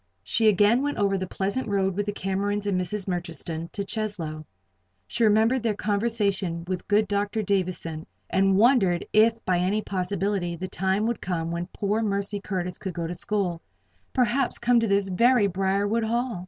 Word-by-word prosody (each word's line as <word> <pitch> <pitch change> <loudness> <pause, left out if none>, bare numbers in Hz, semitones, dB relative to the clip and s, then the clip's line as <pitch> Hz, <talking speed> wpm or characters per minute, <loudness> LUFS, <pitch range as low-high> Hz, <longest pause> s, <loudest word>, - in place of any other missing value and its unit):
She 220 - +2
again 210 +4 +4
went 290 +1 -2
over 200 -1 +2
the 185 -1 -2
pleasant 200 +8 -2
road 195 -2 0
with 205 +1 -2
the - - 0
Camerons 200 +1 -2
and 190 -3 +1
Mrs. 200 +2 -3
Murchiston 170 -2 -4
to 200 - -3
Cheslow. 190 -8 -4 0.6
She 235 - -1
remembered 220 +4 +4
their 220 -2 0
conversation 200 -5 0
with 185 -1 -4
good 210 +1 +3
Dr. 205 +2 -1
Davison, 180 -5 -2 0.2
and 195 0 +2
wondered 205 -7 +4
if 225 +1 +4
by 180 -2 +2
any 200 +4 0
possibility 190 -1 -1
the 185 +3 -5
time 190 +3 0
would 235 -1 -2
come 165 -2 -2
when 170 +1 -3
poor 205 +3 -1
Mercy 200 -1 -1
Curtis 180 -3 -4
could 190 - -5
go 170 - -2
to 165 - -3
school 180 -2 -2 0.5
perhaps 250 +1 +1
come 240 0 +3
to 230 - +1
this 200 -1 +2
very 235 +4 +4
Briarwood 200 +4 0
Hall. 235 -2 -1
200 Hz, 175 wpm, -25 LUFS, 185-215 Hz, 0.6 s, again